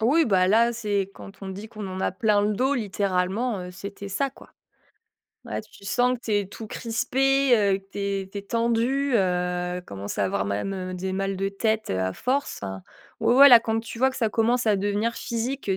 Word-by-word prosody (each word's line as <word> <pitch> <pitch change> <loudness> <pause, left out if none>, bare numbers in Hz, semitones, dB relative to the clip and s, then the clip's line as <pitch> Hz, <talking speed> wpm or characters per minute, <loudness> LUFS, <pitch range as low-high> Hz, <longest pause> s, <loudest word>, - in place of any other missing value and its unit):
Oui, 285 +9 +4
bah 190 -7 +3
là, 230 +4 +4
c'est 205 -4 -1
quand 200 0 -13
on 195 - -5
dit 200 +3 -7
qu'on 210 -3 -7
en 185 0 -5
a - - 0
plein 210 +1 +2
le 210 +1 +1
dos, 260 +6 +1
littéralement, 200 0 -1
heu, 180 - -7
c'était 200 +2 -8
ça, 270 +8 -1
quoi. - - -17 0.9
Ouais - - -4
tu - - -17
sens 245 +5 +2
que 240 - -23
tu 220 - -2
es 205 -1 +1
tout 215 +3 -9
crispé 235 +4 -3 0.3
et 200 -4 +3
que 195 0 -29
tu - - -8
es 200 -1 -2
tu 200 - -5
es - - -6
tendu, 235 +5 0
heu, 180 -2 0
commence 100 +1 -6
à - - +2
avoir 95 0 -1
même 185 - -3
des 185 +1 -3
mal 195 +1 -1
de 195 +1 -1
tête 220 +2 -1
à 95 0 -1
force. 265 - -2 0.6
Ouais, - - +3
ouais 280 +2 +10
là 245 -3 +10
quand 225 -1 -1
tu 225 0 -9
vois 265 +2 +4
que 265 - -10
ça 230 -4 +1
commence 230 +3 +1
à 210 - +4
devenir 205 +4 0
physique, 240 +5 -3
205 Hz, 215 wpm, -25 LUFS, 190-235 Hz, 0.9 s, ouais